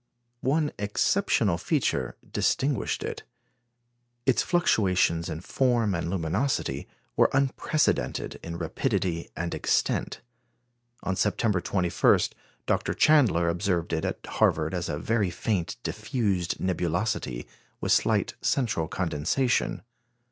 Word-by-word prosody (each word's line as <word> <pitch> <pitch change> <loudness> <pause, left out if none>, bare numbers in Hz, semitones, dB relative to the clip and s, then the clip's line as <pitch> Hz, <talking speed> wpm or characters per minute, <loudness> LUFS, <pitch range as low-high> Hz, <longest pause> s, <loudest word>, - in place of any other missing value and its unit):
One 150 +3 +1
exceptional 105 - +1
feature 90 - 0
distinguished 135 -4 0
it. - - -4 1.0
Its 130 - +3
fluctuations 95 - +2
in 80 0 -5
form 120 -1 +1
and 85 -1 -2
luminosity 95 - -1 0.3
were - - +5
unprecedented 140 +3 0
in 85 0 -6
rapidity 90 0 -1
and 85 0 -3
extent. - - 0 0.8
On 95 - -1
September 105 -1 +1
21, 90 -1 +3 0.5
Dr. - - 0
Chandler 125 - +4
observed 85 -1 0
it 80 - 0
at - - -3
Harvard - - +1
as - - -2
a 75 - -2
very 105 +4 0
faint, 95 +1 -2
diffused 105 -5 -1
nebulosity, 85 - -1 0.3
with - - -1
slight - - +2
central 110 -11 0
condensation. 90 - 0
95 Hz, 105 wpm, -27 LUFS, 85-120 Hz, 1.0 s, were